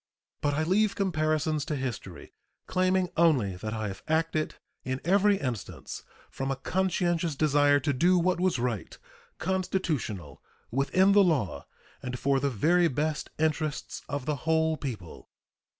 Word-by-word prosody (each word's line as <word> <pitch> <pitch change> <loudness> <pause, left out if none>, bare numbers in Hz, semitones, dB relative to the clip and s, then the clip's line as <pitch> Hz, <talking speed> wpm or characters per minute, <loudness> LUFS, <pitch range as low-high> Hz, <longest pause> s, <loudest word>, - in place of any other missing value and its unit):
But 145 -1 +1
I 155 - +1
leave 200 +5 +2
comparisons 155 -5 0
to 150 - -2
history, 120 -9 -6 0.3
claiming 185 0 +1
only 135 - +3
that 110 +4 -4
I 110 -1 -2
have 95 - -8
acted 160 -1 0 0.3
in 130 +1 -2
every 200 +3 +4
instance 125 - -5 0.3
from 135 0 -3
a 135 - 0
conscientious 175 +1 0
desire 145 -1 +4
to 140 +2 0
do 175 +7 +4
what 180 +1 +1
was 185 -3 +2
right, 115 -8 -3 0.4
constitutional, 160 - -2 0.3
within 185 - +3
the 200 0 +6
law, 145 - 0 0.3
and 125 0 -4
for 135 +1 +2
the 140 +1 +1
very 170 - +3
best 150 +1 -2
interests 155 -1 -1
of 145 -2 -3
the 150 -2 -1
whole 160 +2 +1
people. 120 - -7
155 Hz, 145 wpm, -28 LUFS, 130-175 Hz, 0.4 s, the